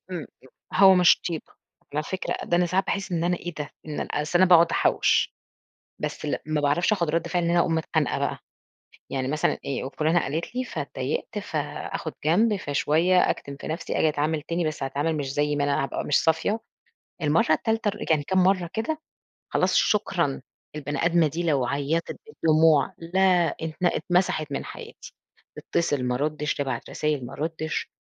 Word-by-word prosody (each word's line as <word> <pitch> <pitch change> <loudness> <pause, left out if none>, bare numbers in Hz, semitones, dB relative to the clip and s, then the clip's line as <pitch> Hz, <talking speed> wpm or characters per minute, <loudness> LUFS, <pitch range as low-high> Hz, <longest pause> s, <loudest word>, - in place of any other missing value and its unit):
امم، 180 - -3
امم، - - -8 0.5
هو 190 -1 +8
مش 180 -1 +5
طيبة 165 -3 -5 0.4
على 150 - 0
فكرة، 185 +5 -3
ده 175 - +1
أنا 180 - +3
ساعات 185 +3 0
باحس 195 -2 -2
إن 170 0 0
أنا 180 0 +1
إيه 175 -1 -7
ده، 145 -1 -4 0.4
أصْل 150 +4 +1
أنا 185 0 +5
باقعُد 170 -1 +6
أحوِّش - - +2 0.6
بس - - -4
لأ، - - -2
ما 155 -1 0
باعرفش 145 +8 +2
آخُد 170 -6 +1
رَد 165 +1 -1
فِعل 175 -1 0
إن 170 - +1
أنا 175 - +3
أقوم 165 - +1
متخانقة 160 -2 0
بقى، - - -2 0.7
يعني 130 -1 -2
مثلًا 150 +1 0
إيه، 135 -2 -3
وفلانة 155 +5 +1
قالِت 160 - -3
لي 255 - -1
فاتضايقت 475 - -4
فاخد - - -4
جنب، 205 +7 +3
فشوية 165 +3 +2
أكتِم 140 0 -4
في - - -7
نفْسي 165 +2 -3
آجي 160 - +4
أتعامل 150 +1 -1
تاني 170 +2 -2
بس 155 -3 -3
أتعامل 145 +4 -1
مش 135 -2 -3
زي 145 0 0
ما 145 - +1
أنا 140 -1 +1
هابقى - - -4
مش 145 - +2
صافية، 165 +8 +1 0.6
المرَّة 155 +1 +2
التالتة، 220 +5 0
ر 205 - -5 0.2
يعني 150 -2 +3
كام 190 +3 +2
مرَّة 185 -2 +2
كده 300 +8 -2 0.5
خلاص - - +2
شكرًا، 175 -10 +1 0.3
البني 145 +1 -2
آدمة 170 -1 +4
دي 165 +4 -3
لو 140 -6 +2
عيّطِت 145 +5 -1
بالدموع 160 - +3
لا، 180 0 +2
ات 160 -1 -3
اتمسحت 175 -4 +1
من 140 - -3
حياتي، - - -10 0.4
تتصل 145 -6 -1
ما 125 0 0
أرُدّش، 150 +2 -1
تبعت 140 -2 -3
رسايل 150 -4 -1
ما 120 - -9
أرُدّش 160 0 -3
160 Hz, 180 wpm, -25 LUFS, 145-180 Hz, 0.7 s, هو